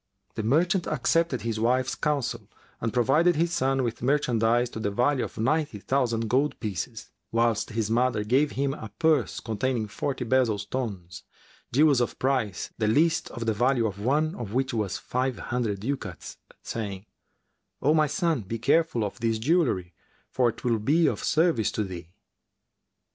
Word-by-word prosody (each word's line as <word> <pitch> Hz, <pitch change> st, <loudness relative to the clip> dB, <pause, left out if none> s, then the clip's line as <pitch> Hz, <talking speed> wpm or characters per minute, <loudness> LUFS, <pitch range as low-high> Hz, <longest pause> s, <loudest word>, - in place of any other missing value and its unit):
The -, -, -3 dB
merchant 165 Hz, -, +2 dB
accepted 165 Hz, -6 st, +1 dB
his 115 Hz, -1 st, -2 dB
wife's 125 Hz, +3 st, +1 dB
counsel 125 Hz, -8 st, -2 dB, 0.3 s
and 115 Hz, -, -2 dB
provided 150 Hz, +9 st, +3 dB
his 170 Hz, +2 st, +1 dB
son 135 Hz, -2 st, +1 dB
with 115 Hz, -1 st, -3 dB
merchandise 120 Hz, -3 st, +2 dB
to -, -, -6 dB
the 100 Hz, -, -1 dB
value 125 Hz, +6 st, +1 dB
of -, -, -7 dB
ninety 145 Hz, +1 st, 0 dB
thousand 115 Hz, 0 st, 0 dB
gold 135 Hz, +6 st, +1 dB
pieces, 110 Hz, +2 st, -5 dB, 0.2 s
whilst 115 Hz, -1 st, +1 dB
his 110 Hz, -1 st, -2 dB
mother 120 Hz, -2 st, +2 dB
gave 135 Hz, +7 st, +2 dB
him 140 Hz, 0 st, 0 dB
a 110 Hz, -6 st, -8 dB
purse 160 Hz, -2 st, +2 dB
containing 110 Hz, +1 st, -2 dB
forty 130 Hz, +4 st, -3 dB
bezel 120 Hz, -3 st, +2 dB
stones, 100 Hz, -4 st, -5 dB, 0.5 s
jewels 140 Hz, -1 st, +4 dB
of 120 Hz, -, -2 dB
price, 125 Hz, -9 st, -1 dB
the 110 Hz, -, +1 dB
least 160 Hz, +9 st, +2 dB
of 115 Hz, 0 st, -6 dB
the 110 Hz, -, +1 dB
value 120 Hz, +2 st, +2 dB
of 100 Hz, -2 st, -3 dB
one 150 Hz, +7 st, +1 dB
of 115 Hz, -2 st, -6 dB
which 130 Hz, -1 st, 0 dB
was 105 Hz, -5 st, -1 dB
five 130 Hz, -1 st, -2 dB
hundred 110 Hz, -5 st, -2 dB
ducats, 110 Hz, -7 st, -5 dB, 0.3 s
saying, 100 Hz, -3 st, -5 dB, 0.7 s
"O 150 Hz, +3 st, +3 dB
my 155 Hz, -1 st, +3 dB
son, 165 Hz, -, 0 dB
be 110 Hz, +3 st, -5 dB
careful 140 Hz, 0 st, +2 dB
of 105 Hz, +3 st, -5 dB
this 115 Hz, -1 st, 0 dB
jewellery 115 Hz, -, +1 dB, 0.4 s
for 125 Hz, -2 st, +2 dB
'twill 115 Hz, 0 st, -1 dB
be 155 Hz, +10 st, +3 dB
of -, -, 0 dB
service 150 Hz, -, +2 dB
to 110 Hz, -, 0 dB
thee." 90 Hz, -4 st, -7 dB
120 Hz, 165 wpm, -26 LUFS, 110-140 Hz, 0.7 s, jewels